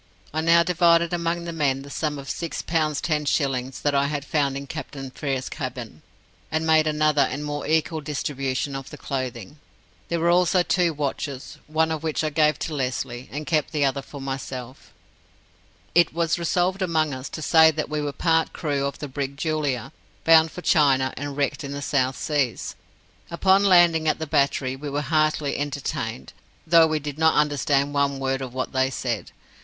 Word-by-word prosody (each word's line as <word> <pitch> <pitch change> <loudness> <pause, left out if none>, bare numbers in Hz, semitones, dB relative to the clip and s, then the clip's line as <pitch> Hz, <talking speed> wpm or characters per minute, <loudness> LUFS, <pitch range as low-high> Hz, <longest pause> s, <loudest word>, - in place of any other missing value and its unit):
I 160 - 0
now 165 +1 +5
divided 170 -1 +3
among 170 0 -1
the 170 - -5
men 135 -4 0
the 140 - -11
sum 150 -1 -2
of 140 -1 -9
six 170 +3 -4
pounds 155 -3 0
ten 155 -3 0
shillings 135 -2 -1
that 145 - +1
I 140 0 +2
had 145 -1 -3
found 140 -3 0
in 140 - -6
Captain 135 -2 -7
Frere's 135 -2 -3
cabin, 125 - -6 0.5
and 160 +1 0
made 160 -1 +4
another 155 -1 +2
and 150 +1 -1
more 145 0 -4
equal 160 0 +1
distribution 140 -2 -3
of 135 -1 -6
the - - -10
clothing. 130 0 -5 0.5
There 170 - 0
were 170 +1 +3
also 180 +1 +3
two 175 -1 +2
watches, 140 -1 -4
one 160 +1 +1
of 160 -2 -2
which 160 -1 -1
I 155 - -1
gave 150 0 +3
to 160 - -3
Lesly, 125 -2 -3
and 150 +2 -5
kept 155 -3 0
the 145 -2 +2
other 140 0 0
for 140 - -10
myself. 135 -1 -6 1.0
It 170 -1 +4
was 170 0 +1
resolved 180 +3 0
among 160 -5 +1
us 130 +1 -6
to 155 - -6
say 160 +1 +6
that 155 0 -2
we 150 0 -2
were 145 -1 -2
part 160 +3 +1
crew 140 -3 -1
of 140 - -6
the 150 - -6
brig 140 0 -4
Julia, 150 -6 -1 0.3
bound 160 -1 +6
for 180 - -8
China 135 -4 +3
and 145 0 -5
wrecked 145 +2 -1
in 140 0 -5
the 140 - -5
South 130 -2 0
Seas. 145 -6 -1 0.5
Upon 190 +3 +3
landing 175 -4 +5
at 155 - +2
the 160 - -4
battery, 140 -2 +1
we 145 +2 -6
were 145 +1 -1
heartily 155 0 +1
entertained, 140 -4 -4 0.3
though 165 0 +6
we 155 -1 0
did 145 0 -6
not 160 0 +4
understand 145 -1 +1
one 140 -1 +1
word 135 0 -1
of 130 -2 -5
what 130 +1 -3
they 130 0 +2
said. 120 -4 -3
145 Hz, 190 wpm, -24 LUFS, 135-160 Hz, 1.0 s, say